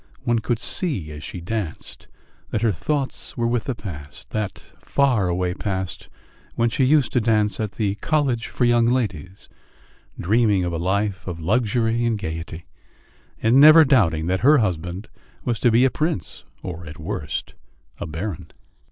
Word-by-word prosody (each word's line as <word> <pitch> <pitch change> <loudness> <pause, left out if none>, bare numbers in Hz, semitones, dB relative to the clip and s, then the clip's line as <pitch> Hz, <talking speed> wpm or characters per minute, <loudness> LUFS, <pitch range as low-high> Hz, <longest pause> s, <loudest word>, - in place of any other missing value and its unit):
One 120 -1 +1
could 120 +1 -1
see 115 - -2
as 75 +1 -9
she 90 - -7
danced 100 -2 -5 0.4
that 110 - -2
her 115 - +4
thoughts 135 - -3
were 120 - 0
with 120 -1 0
the 130 - -2
past, 75 -9 -9
that 110 -3 -3 0.2
faraway 95 -10 +1
past 95 -3 -4 0.5
when 115 0 +1
she 130 - +2
used 145 0 +3
to 125 - +3
dance 105 -2 +1
at 105 -2 -2
the 105 -3 0
"College 135 -7 0
for 125 - 0
Young 120 -1 +4
Ladies," 100 - -2 0.7
dreaming 105 0 +2
of 85 - -2
a - - -1
life 95 +2 -1
of 85 -2 -4
luxury 115 +5 +1
and 115 -2 +1
gaiety, 80 -2 -6 0.8
and 115 +4 +4
never 155 +3 +9
doubting 90 - +3
that 95 +2 0
her 150 +4 +6
husband 90 - -2 0.4
was 120 -3 -1
to 120 - +4
be 120 +3 +4
a 130 - +3
prince 155 - -3 0.2
or, 85 -1 -6
at 75 - -8
the - - -12
worst, - - -4 0.5
a - - -4
baron. 80 0 -5
110 Hz, 165 wpm, -22 LUFS, 90-120 Hz, 0.8 s, never